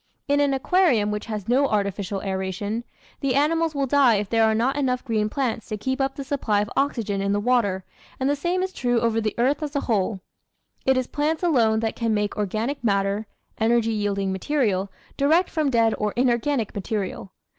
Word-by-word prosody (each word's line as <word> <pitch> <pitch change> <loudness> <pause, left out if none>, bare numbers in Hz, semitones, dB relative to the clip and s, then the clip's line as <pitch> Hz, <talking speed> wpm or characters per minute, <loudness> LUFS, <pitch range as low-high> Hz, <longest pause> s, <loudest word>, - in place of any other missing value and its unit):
In 285 0 +2
an 285 -1 +3
aquarium 265 - +2
which 210 +2 -4
has 210 -3 -5
no 265 +4 +3
artificial 200 -2 -2
aeration, 195 +3 -3 0.4
the 270 -2 0
animals 320 +2 +2
will 280 -1 +1
die 270 -3 +4
if 200 -1 -2
there 225 -1 +4
are 220 0 +2
not 250 +5 +1
enough 255 -3 -1
green 215 -3 0
plants 245 -3 -2
to 215 - -4
keep 260 +5 -2
up 270 0 0
the 280 - -5
supply 265 -7 0
of 210 - -2
oxygen 225 -8 0
in 200 0 0
the 205 - +1
water, 205 -5 +1 0.4
and 265 - 0
the 285 - +2
same 355 +5 -1
is 375 0 -3
true 245 -2 +1
over 225 -1 +1
the 215 -1 -2
earth 265 +5 +1
as 300 -1 -4
a 280 - +1
whole. 205 -3 0 0.7
It 265 0 +4
is 255 - +1
plants 305 +6 -1
alone 230 -10 +3
that 225 -1 -1
can 230 -2 0
make 210 0 -1
organic 220 +7 -2
matter 200 0 0 0.3
(energy 225 0 +2
yielding 200 -2 -1
material) 200 -3 0 0.3
direct 315 +6 +3
from 310 -4 +1
dead 230 -3 +3
or 210 -1 -1
inorganic 240 -1 +1
material. 195 -2 -4
230 Hz, 200 wpm, -24 LUFS, 210-275 Hz, 0.7 s, die